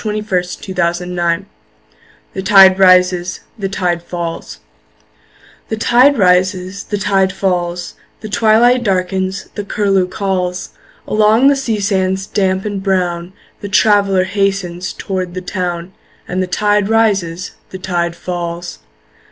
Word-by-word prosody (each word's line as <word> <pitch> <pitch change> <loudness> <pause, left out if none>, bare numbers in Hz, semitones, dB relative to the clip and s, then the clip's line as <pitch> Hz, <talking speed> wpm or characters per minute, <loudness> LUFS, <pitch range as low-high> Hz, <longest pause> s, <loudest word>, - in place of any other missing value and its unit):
Henry 215 -1 -2
Wadsworth 180 -3 -3
Longfellow 175 0 -1 0.9
The 190 - -4
Tide 190 -1 +6
Rises, 185 -1 +3 0.2
The 195 -1 -2
Tide 180 -3 -1
Falls 170 -1 -6 1.1
THE 220 - -2
tide 250 +5 +4
rises, 185 0 +1
the 205 - -3
tide 195 -1 +1
falls, 175 -2 -2 0.3
The 215 - -6
twilight 230 +4 +3
darkens, 190 -1 -1
the 205 - -4
curlew 195 -2 +1
calls; 185 -2 -3 0.4
Along 215 +5 +4
the 285 - +3
sea 235 -6 -2
sands 190 -1 0
damp 190 -1 -1
and 205 -2 -3
brown 180 -2 -1 0.3
The 205 - -7
traveller 195 -1 +3
hastens 185 -2 -2
toward 185 -2 -4
the 185 - -4
town 180 -1 -4 0.3
And 185 +1 -2
the 185 - -1
tide 205 +2 +1
rises, 195 -6 0 0.2
the 190 - -7
tide 175 -2 -2
falls. 175 -1 -5
190 Hz, 125 wpm, -16 LUFS, 180-205 Hz, 1.1 s, Tide